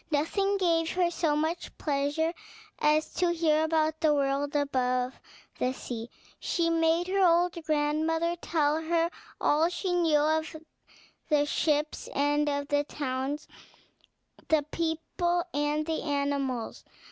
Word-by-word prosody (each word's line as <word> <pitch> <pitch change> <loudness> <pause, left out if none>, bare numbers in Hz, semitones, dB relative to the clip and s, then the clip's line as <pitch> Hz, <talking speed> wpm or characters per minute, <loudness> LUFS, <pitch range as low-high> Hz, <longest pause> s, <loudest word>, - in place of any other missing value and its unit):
Nothing 390 +7 +1
gave 330 -3 +2
her 355 -1 +1
so 320 -3 +1
much 315 +3 -2
pleasure 295 +3 0 0.5
as 305 +1 +2
to 355 -1 +1
hear 315 -2 +2
about 315 0 +1
the 310 - +4
world 280 +1 0
above 255 -3 0 0.4
the 255 +1 +1
sea. 235 -3 -6 0.3
She 335 -2 0
made 330 +1 +2
her 390 +1 +2
old 350 0 +4
grandmother 315 +3 0
tell 310 -2 0
her 335 +1 +1 0.3
all 310 +3 +3
she 360 +1 -2
knew 330 -4 +3
of 315 +1 0 0.7
the 295 -2 +3
ships 300 0 0
and 290 +1 +2
of 285 0 -2
the 290 0 +2
towns, 280 0 -3 1.0
the 315 -2 +3
people 340 +2 -1
and 295 +1 0
the 320 0 -2
animals. 280 -5 -2
310 Hz, 130 wpm, -28 LUFS, 290-330 Hz, 1.0 s, the